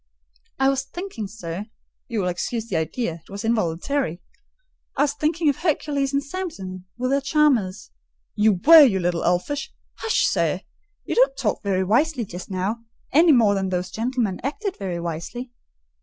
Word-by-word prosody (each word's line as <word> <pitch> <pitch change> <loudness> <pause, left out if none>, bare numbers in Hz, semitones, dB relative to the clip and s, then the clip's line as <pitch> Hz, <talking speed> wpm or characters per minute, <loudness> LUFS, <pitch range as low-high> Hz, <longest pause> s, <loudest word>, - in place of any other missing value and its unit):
"I 270 - +3
was 275 -1 +1
thinking, 310 - -6
sir 195 -1 -6 0.4
(you 230 -4 -1
will 180 - -1
excuse 215 +6 -2
the - - -3
idea; 165 +1 -2
it - - -25
was 200 +2 -6
involuntary), 215 - 0 0.8
I - - +4
was 285 -1 +1
thinking 310 +3 0
of 285 - +3
Hercules 290 -4 0
and 280 0 0
Samson 240 - -6
with 255 +1 -1
their 280 0 +2
charmers—" 265 -10 +1 0.4
"You 215 0 +4
were, 315 - +8
you 225 -10 +5
little 175 -1 0
elfish—" 185 +12 0 0.3
"Hush, 450 - +2
sir! - - +1 0.4
You - - -2
don't - - +3
talk - - -1
very 190 -2 0
wisely 245 +5 +1
just 180 0 -8
now; 195 +4 -2 0.3
any 325 +3 +6
more 225 -7 +5
than 190 -1 -1
those 180 0 -2
gentlemen 225 -1 -1
acted 385 - -3
very 185 -4 -4
wisely. 170 +10 -5
230 Hz, 165 wpm, -23 LUFS, 185-285 Hz, 0.8 s, were